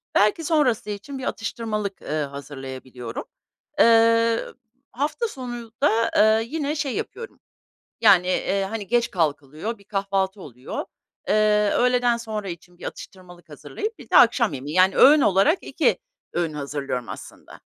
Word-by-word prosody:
Belki 210 +11 +3
sonrası 285 -10 +1
için 210 +7 -6
bir 260 - -7
atıştırmalık, 215 -4 -4
ııı, 150 0 -2
hazırlayabiliyorum. 130 -4 -8 0.6
Eee, 230 -2 +4 0.5
hafta 300 - -2
sonunda, 240 - -1
eee, 220 +1 +4
yine 300 -1 -2
şey 290 -4 -2
yapıyorum, 470 0 -6 0.6
yani, 180 -2 +6
eee, 195 +1 0
hani, 215 -3 -5
geç 240 0 +1
kalkılıyor, 155 - -2
bir 200 - -20
kahvaltı 195 -1 -2
oluyor. 125 -5 -7 0.4
Eee, 210 0 +3
öğleden 245 -1 +2
sonra 215 -4 -5
için 175 +1 -10
bir - - -10
atıştırmalık 175 -3 -10
hazırlayıp 430 - -6
bir 245 - -13
de - - +5
akşam 235 - +5
yemeği, 140 +4 -6
yani, 185 +1 +4
öğün 290 +2 +7
olarak 200 - +4
2 - - +1 0.4
öğün 170 -3 -1
hazırlıyorum 140 -4 -4
aslında. - - -11
210 Hz, 135 wpm, -23 LUFS, 175-240 Hz, 0.6 s, öğün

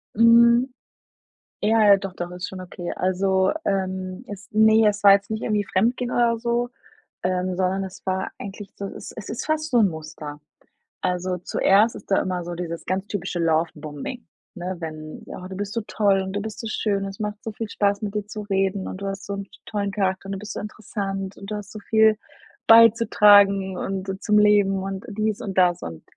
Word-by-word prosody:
Mhm. 235 +3 +6 0.9
Ja, 220 +1 +4
ja, 200 - +8
doch, 195 -1 -6
doch, 175 0 -5
ist 180 0 -5
schon 185 -1 -8
okay. 175 -1 -6
Also, 190 +1 +1
ähm, 190 +1 -2
es 205 -1 -9
ne, 220 +1 +5
es 205 0 0
war 200 -1 +9
jetzt 200 +1 +1
nicht 220 +1 -3
irgendwie 210 -2 +1
fremdgehen 240 +6 0
oder 235 -1 +2
so, 240 +1 -1 0.5
ähm, 185 0 -1
sondern 190 +1 0
es 190 - -11
war 190 0 -1
eigentlich 200 0 -8
so, 200 - -5
es - - -9
es 210 - -8
ist 230 - -4
fast 310 0 -1
so 245 - +4
'n 200 -4 +4
Muster. 155 -2 -8 0.6
Also 180 0 -1
zuerst 200 +5 +3
ist - - -12
da - - +4
immer 180 -2 -2
so 175 - -5
dieses 170 -1 -5
ganz 190 +3 -2
typische 185 -3 -3
Lovebombing, 160 - -2 0.3
ne, 180 +1 -4
wenn: 155 -1 -7
„Oh, 185 - -8
du 190 - -8
bist 205 +1 -4
so 230 - -1
toll 200 -2 +2
und 190 0 -5
du 205 - -2
bist 220 +1 -6
so 225 - -5
schön, 200 -2 -1
es 195 +1 -7
macht 210 0 -4
so 225 - -4
viel 215 0 -6
Spaß, 200 0 0
mit 205 -1 -3
dir 210 -1 -2
zu 215 0 -6
reden 195 -1 -1
und - - -6
du 200 - -3
hast 195 +1 -5
so 200 - -4
'n 200 -1 -5 0.2
tollen 200 -2 -2
Charakter 190 -1 -1
und 195 - -4
du 195 - -4
bist 210 -1 -7
so - - -5
interessant 195 -2 -5
und 195 +1 -9
du - - -1
hast 210 0 -7
so 215 - -8
viel 220 0 +4 0.5
beizutragen 205 -4 +6
und 195 0 -4
zum 210 -1 +3
Leben 200 -2 +4
und 195 0 -5
dies 215 0 -2
und 195 -2 -5
das.“ 180 -2 +3
Und 80 -1 -7
195 Hz, 205 wpm, -23 LUFS, 185-215 Hz, 0.9 s, war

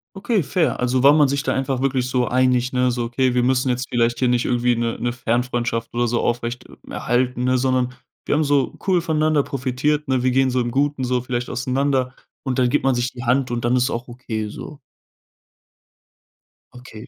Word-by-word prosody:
Okay, 200 -1 0
fair. 165 +2 0
Also, 125 +1 +1
war 140 +2 +7
man 150 -2 +5
sich 140 +1 -1
da - - -1
einfach 135 -1 -1
wirklich 130 -2 0
so 125 -1 0
einig, 125 0 +2
ne, 125 -1 +1
so: 120 0 -2
„Okay, 125 +1 0
wir 125 - +2
müssen 130 +1 +1
jetzt 125 0 -1
vielleicht 120 0 +1
hier 130 - +2
nicht 120 0 +1
irgendwie 120 0 +1
'ne 115 0 -1
'ne 120 0 -1
Fernfreundschaft 120 -1 -2
oder 120 0 0
so 120 +1 0
aufrecht 120 0 -2 0.2
erhalten, 125 0 -1
ne, 130 0 +2
sondern 125 -1 0 0.3
wir - - +1
haben 155 - +2
so 140 -3 +1
cool 185 -3 +2
voneinander 155 -2 +1
profitiert, 140 +3 -1
ne? 130 -2 +1
Wir 130 - +2
gehen 130 +1 +2
so 125 0 +1
im 120 - -2
Guten 140 0 0
so 125 -1 0
vielleicht 125 -1 -3
auseinander." 130 +1 -1 0.3
und 130 -1 -1
dann 125 -1 +3
gibt 145 - +1
man 135 -1 +3
sich 120 +1 -1
die 125 0 -8
Hand 125 +1 +1
und 120 -1 -2
dann 120 +2 +2
ist 125 +1 +2
auch 120 0 -5
okay 110 -3 -5
so. 150 +6 -9 2.0
Okay. 125 -3 -11
125 Hz, 205 wpm, -21 LUFS, 120-135 Hz, 2.0 s, war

